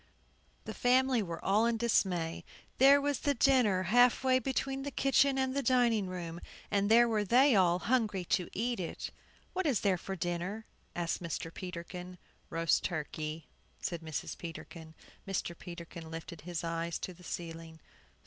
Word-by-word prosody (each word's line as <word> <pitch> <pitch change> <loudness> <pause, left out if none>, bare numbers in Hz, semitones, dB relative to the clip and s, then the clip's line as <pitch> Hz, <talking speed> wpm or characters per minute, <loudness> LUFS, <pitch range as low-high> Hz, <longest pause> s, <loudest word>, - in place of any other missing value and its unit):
The - - -5
family 255 -1 +3
were 170 -4 -6
all 210 +4 +3
in 235 -1 +1
dismay. 180 -8 0 0.4
There 275 +2 +8
was 285 -2 0
the 285 -1 +1
dinner, 235 -8 +3
half 245 +7 +4
way 255 -1 +4
between 270 0 -2
the 285 - -3
kitchen 275 0 +3
and 265 -1 0
dining 235 -5 +3
room, 175 -2 -6 0.3
and 200 0 +2
there 235 +2 +7
were 215 -2 +1
they 250 +5 +5
all 180 -3 +4
hungry 215 -4 0
to 180 0 0
eat 235 +1 -2
it! 170 - -5 0.4
"What 370 -2 0
is 260 -8 +1
there 190 -3 +2
for 195 - -5
dinner?" 175 +5 -3 0.3
asked 175 0 -2
Mr. 165 0 -4
Peterkin. 180 0 -7 0.3
"Roast 165 0 +1
turkey," 155 -1 -4 0.3
said 170 -2 -3
Mrs. 160 -2 -5
Peterkin. 165 -1 -9 0.3
Mr. 185 -3 -2
Peterkin 170 -2 -9
lifted 165 0 -8
his 170 0 -5
eyes 165 0 -2
to 185 - -6
the 180 +1 -17
ceiling. 165 -2 -7
190 Hz, 160 wpm, -32 LUFS, 170-245 Hz, 0.4 s, There